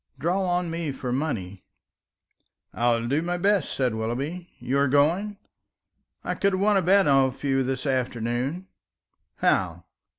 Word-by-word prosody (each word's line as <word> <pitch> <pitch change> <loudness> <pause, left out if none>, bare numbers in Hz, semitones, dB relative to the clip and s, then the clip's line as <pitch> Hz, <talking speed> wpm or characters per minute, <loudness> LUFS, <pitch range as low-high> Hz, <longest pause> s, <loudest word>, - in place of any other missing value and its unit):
Draw 175 +7 0
on 175 -2 0
me 165 -3 -3
for 130 -2 -5
money." 100 -10 -3 1.1
"I 120 +1 +1
will 115 0 -3
do 140 +5 +1
my 175 +1 -2
best," 200 +2 +1
said 125 -4 0
Willoughby. 135 +11 -4
"You 130 +3 -1
are 140 - +3
going? 170 +10 +2 0.9
I - - -2
could 200 -1 +1
have 185 - 0
won 210 0 +4
a 195 - +4
bet 190 +1 +4
off 135 -2 +2
you 135 -1 +2
this 130 +1 -2
afternoon." 130 +5 -1 0.7
"How?" - - 0
140 Hz, 155 wpm, -25 LUFS, 125-175 Hz, 1.1 s, won